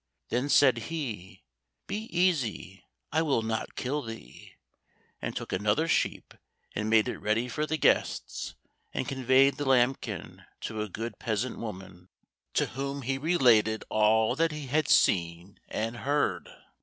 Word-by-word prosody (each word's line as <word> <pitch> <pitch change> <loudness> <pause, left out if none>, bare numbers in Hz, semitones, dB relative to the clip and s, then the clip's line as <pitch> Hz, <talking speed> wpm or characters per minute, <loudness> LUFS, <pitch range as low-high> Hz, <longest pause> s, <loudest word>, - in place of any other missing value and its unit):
Then 125 +4 0
said 130 -4 +5
he, 120 - -5 0.4
"Be 210 +3 -4
easy, 140 - 0 0.3
I 160 - +2
will 140 -8 +1
not 110 0 -3
kill 140 +4 -2
thee," 115 - -10 0.7
and - - -4
took - - -5
another 110 +11 +1
sheep - - 0 0.4
and 105 +1 -2
made 110 -1 +4
it - - -4
ready 110 +3 0
for 150 +5 -2
the 160 - -1
guests, - - 0 0.4
and - - -1
conveyed 130 +1 +3
the 145 - -3
lambkin 130 0 0 0.2
to 110 - -4
a 105 - -3
good 115 +5 -6
peasant 115 +2 -2
woman, 95 -4 -8 0.5
to - - +3
whom 140 +1 -4
he 135 +2 -1
related 120 -9 +3
all 110 +1 +3
that 165 0 +2
he 150 -1 -6
had 150 +3 +1
seen 85 - +2
and 115 +2 -3
heard. 145 +4 0
125 Hz, 145 wpm, -29 LUFS, 110-145 Hz, 0.7 s, said